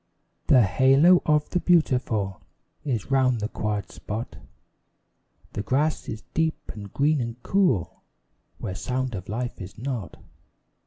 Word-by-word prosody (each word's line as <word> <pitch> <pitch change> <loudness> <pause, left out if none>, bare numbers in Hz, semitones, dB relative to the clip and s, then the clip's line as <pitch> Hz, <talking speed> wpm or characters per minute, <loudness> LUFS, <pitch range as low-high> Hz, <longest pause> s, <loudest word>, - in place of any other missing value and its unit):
The 125 -3 +6
halo 135 - +5
of 150 -1 +3
the 180 - +1
beautiful 125 - +1 0.4
Is 125 -3 -3
round 130 -3 +3
the 105 - -1
quiet 105 -2 -3
spot; 110 +3 -6 1.2
The - - -2
grass 140 +9 0
is 110 - -6
deep 160 0 -1
and 100 -2 -9
green 145 0 +2
and 115 +1 -5
cool, 135 - +1 0.6
Where 95 - -5
sound 130 +5 -2
of 95 -2 -6
life 120 +2 -4
is 95 0 -9
not. 120 -3 -4
125 Hz, 135 wpm, -25 LUFS, 105-145 Hz, 1.2 s, The